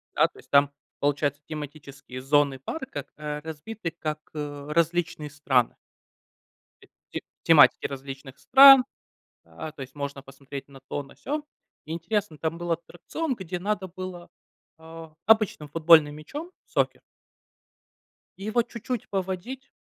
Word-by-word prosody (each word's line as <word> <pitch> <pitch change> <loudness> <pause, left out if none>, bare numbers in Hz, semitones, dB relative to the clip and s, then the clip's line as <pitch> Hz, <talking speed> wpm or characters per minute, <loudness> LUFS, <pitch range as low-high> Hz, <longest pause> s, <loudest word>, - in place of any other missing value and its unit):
Да, - - +5
то - - -18
есть. - - -18
Там, 140 0 +5 0.3
получается, 145 0 0
тематические 145 -4 -8
зоны 140 0 +3
парка, 145 - -5
к, - - -39
э, 150 0 -4
разбиты 165 +4 -6
как, 155 -2 -4
э, 145 -1 -5
различные 170 -1 0
страны. 135 -4 +1 1.1
Т - - -18 0.2
т - - -3 0.2
тематики - - +6
различных 135 0 -8
стран. 270 -1 +9 0.6
А, 160 -1 -8
то 140 - -8
есть 130 0 -10
можно 140 -1 -5
посмотреть 135 +1 -9
на 135 -1 -14
то, 145 - -2
на 140 - -16
сё. 300 +1 -3 0.4
Интересно, 170 +2 -2
там 160 +2 -2
был 175 0 -1
аттракцион, 175 - -3
где 185 -3 -5
надо 195 0 -2
было, 180 -1 -7 0.5
э, 160 0 -10 0.2
обычным 215 -9 +3
футбольным 155 -1 +6
мячом, 290 - -7 0.2
сокер - - 0 1.4
И 195 - -9
его 230 +3 +2
чуть-чуть 235 0 -5
поводить. 195 +8 -4
160 Hz, 135 wpm, -26 LUFS, 145-190 Hz, 1.4 s, стран